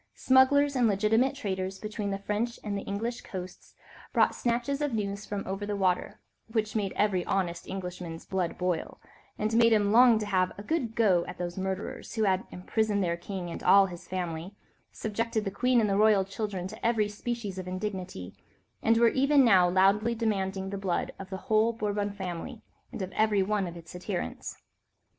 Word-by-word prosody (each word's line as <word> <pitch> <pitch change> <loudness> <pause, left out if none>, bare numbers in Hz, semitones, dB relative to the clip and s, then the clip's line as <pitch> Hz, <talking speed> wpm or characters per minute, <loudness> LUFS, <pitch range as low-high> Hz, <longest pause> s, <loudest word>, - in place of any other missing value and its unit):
Smugglers 280 +2 +4
and 245 -3 +4
legitimate 220 +6 +2
traders 190 -6 -3
between 210 0 -4
the 195 - -1
French 210 +4 -2
and 200 -1 -2
English 230 +5 -3
coasts 185 -1 -9 0.4
brought - - +3
snatches 245 +4 -1
of 290 -5 0
news 200 -1 -3
from 205 -1 -4
over 195 +2 -4
the 205 0 -2
water, 185 -2 0 0.3
which 220 -1 -2
made 200 -3 0
every 195 -4 +1
honest 175 -3 -1
Englishman's 180 -3 -6
blood 185 -3 -2
boil, 180 -2 -2 0.4
and 215 +1 -1
made 230 0 +5
him 205 -2 +3
long 240 0 +7
to 215 - -2
have 185 -3 +1
"a 205 - -7
good 245 -4 -2
go" 190 -7 +4
at - - -7
those 175 -1 -4
murderers, 190 +3 -4
who 220 - +1
had 190 -2 +1
imprisoned 205 +2 -1
their 170 -1 0
king 175 0 -6
and - - -6
all 195 0 +6
his 175 -2 -9
family, 180 0 -4 0.4
subjected 220 0 -2
the 195 - -2
queen 250 +5 +2
and 220 - +2
the 195 - +1
royal 210 -2 +4
children 195 -2 -4
to - - -11
every 225 -2 +2
species 210 -2 -4
of 185 - -6
indignity, 185 - -5 0.5
and 225 0 +3
were 235 0 +6
even 275 +1 +4
now 185 -6 +6
loudly 200 +5 +3
demanding 195 -4 -1
the 200 - -4
blood 190 -3 -1
of 195 -1 -8
the 190 - -4
whole 220 +1 +3
Bourbon 205 -2 -2
family 190 +3 -6 0.3
and 195 - -4
of 185 - -5
every 215 -3 +2
one 205 -1 0
of 170 0 -8
its 170 +1 -12
adherents. 180 - -5
200 Hz, 185 wpm, -29 LUFS, 185-225 Hz, 0.5 s, long